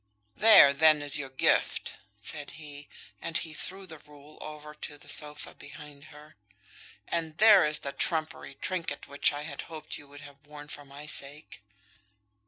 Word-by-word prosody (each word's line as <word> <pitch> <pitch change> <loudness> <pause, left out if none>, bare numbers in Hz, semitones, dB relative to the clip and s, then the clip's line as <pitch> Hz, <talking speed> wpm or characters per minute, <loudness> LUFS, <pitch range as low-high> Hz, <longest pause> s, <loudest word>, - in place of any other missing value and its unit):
"There, 210 -11 +8
then, 155 0 +5
is 145 0 +2
your 135 -2 -5
gift," 130 - 0 0.2
said 150 -2 -6
he, 145 -2 -10 0.3
and 165 -1 -2
he 160 -2 -5
threw 190 +4 -4
the 160 -4 -10
rule 150 +1 -17
over 150 0 -9
on 150 - -14
to 145 - -6
the - - -16
sofa 150 -1 0
behind 150 -4 -13
her. 150 -2 -16 0.7
"And 165 -2 -3
there 210 -3 +7
is 150 0 +1
the 140 - -4
trumpery 160 -4 -3
trinket 185 +1 -4
which 140 0 +2
I 145 0 -6
had 145 -2 -6
hoped 160 -2 -7
you 145 - -14
would 145 0 -13
have 145 0 -15
worn 145 0 -11
for 145 0 -8
my 140 +2 -11
sake." 145 -3 -1
150 Hz, 175 wpm, -29 LUFS, 145-160 Hz, 0.7 s, There